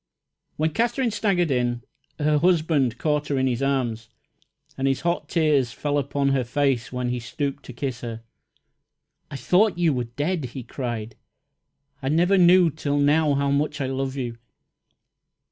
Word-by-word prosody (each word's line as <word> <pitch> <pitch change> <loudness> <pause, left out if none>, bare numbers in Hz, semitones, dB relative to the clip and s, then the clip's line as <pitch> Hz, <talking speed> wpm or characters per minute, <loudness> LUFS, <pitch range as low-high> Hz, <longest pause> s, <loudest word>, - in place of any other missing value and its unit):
When 155 +1 0
Katherine 235 - 0
staggered 190 -7 +1
in, 120 -1 0 0.3
her 150 0 +2
husband 155 -7 +2
caught 150 -1 0
her 140 - -1
in 130 - +1
his 125 -1 -1
arms, 120 -5 -1 0.7
and 135 0 -1
his 135 -1 0
hot 170 0 -1
tears 150 -7 +2
fell 145 -1 -1
upon 140 0 0
her 135 -2 +1
face 130 -1 0
when 125 -1 -2
he 125 0 -2
stooped 140 +3 -4
to 125 - -9
kiss 130 0 -4
her. 115 -1 -6 1.1
"I - - -7
thought 180 - +2
you 170 -3 +2
were 125 -2 -2
dead!" 145 +8 -2
he 125 +1 -7
cried. 120 -2 -5 0.9
"I 135 - -2
never 175 +6 +3
knew 175 -1 +6
till 145 -1 -2
now 145 +1 +3
how 140 0 +1
much 145 +1 0
I 135 - -1
love 135 0 -3
you!" 120 -3 -4
140 Hz, 160 wpm, -24 LUFS, 125-160 Hz, 1.1 s, knew